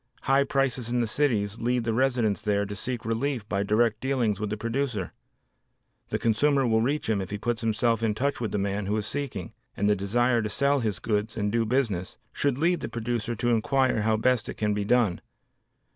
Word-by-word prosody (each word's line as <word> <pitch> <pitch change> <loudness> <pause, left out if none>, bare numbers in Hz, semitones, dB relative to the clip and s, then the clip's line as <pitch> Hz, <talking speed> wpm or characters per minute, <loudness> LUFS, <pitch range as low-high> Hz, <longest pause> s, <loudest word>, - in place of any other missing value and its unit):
High 135 +1 +3
prices 135 -3 0
in 120 +1 0
the 120 - +2
cities 110 -4 0
lead 120 +1 0
the 115 0 -1
residents 120 -5 +1
there 100 -1 +1
to 105 +1 -6
seek 120 +4 -4
relief 115 0 -1
by 100 -2 -1
direct 110 +2 +2
dealings 125 -7 0
with 105 0 -2
the 105 - -3
producer. 115 -4 -2 1.0
The - - 0
consumer 135 +5 +2
will 110 -1 +3
reach 140 +6 0
him 110 -3 +1
if 95 - -5
he 105 - -3
puts 115 +2 -2
himself 115 0 +1
in 110 -2 +1
touch 140 +2 -1
with 115 - -2
the - - -1
man 100 0 -2
who 105 +2 0
is 105 - -2
seeking, 120 -6 -4 0.2
and 100 - +1
the 105 - +4
desire 120 +5 +1
to 105 - -2
sell 140 +5 +2
his 110 -6 -1
goods 105 0 -2
and 105 -1 0
do 115 0 +1
business, 105 -8 -1 0.2
should 140 -3 0
lead 170 +4 +2
the - - -5
producer 120 0 -2
to 120 +2 -1
inquire 130 +1 +2
how 110 +1 +2
best 125 +1 +1
it - - -6
can 105 -1 0
be 105 0 -2
done. 115 -6 +2
115 Hz, 215 wpm, -27 LUFS, 105-125 Hz, 1.0 s, the